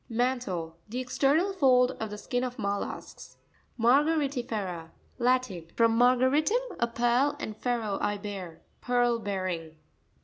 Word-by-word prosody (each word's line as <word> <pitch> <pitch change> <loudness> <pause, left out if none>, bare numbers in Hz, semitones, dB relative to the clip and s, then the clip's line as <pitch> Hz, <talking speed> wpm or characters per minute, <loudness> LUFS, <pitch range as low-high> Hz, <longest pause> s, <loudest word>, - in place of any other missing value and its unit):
Man'tLte.—The 225 -5 -2
external 285 +9 +1
fold 255 -7 +4
of 220 - -3
the 210 - -6
skin 245 +4 -2
of 250 -1 -4
mollusks, 200 -1 -5 0.4
Ma'reariti'FerA.— 240 - +1 0.3
Latin. 245 -9 +1
From 230 -1 +3
mar 245 +2 +5
garitum, 310 - +1
a 235 - +2
pearl, 240 +5 +2
and 215 - -5
fero, 225 -4 -2
I 205 0 0
bear. 195 -5 -7 0.2
Pearl 245 -1 +2
bearing. 185 -6 -3
240 Hz, 125 wpm, -28 LUFS, 205-255 Hz, 0.4 s, mar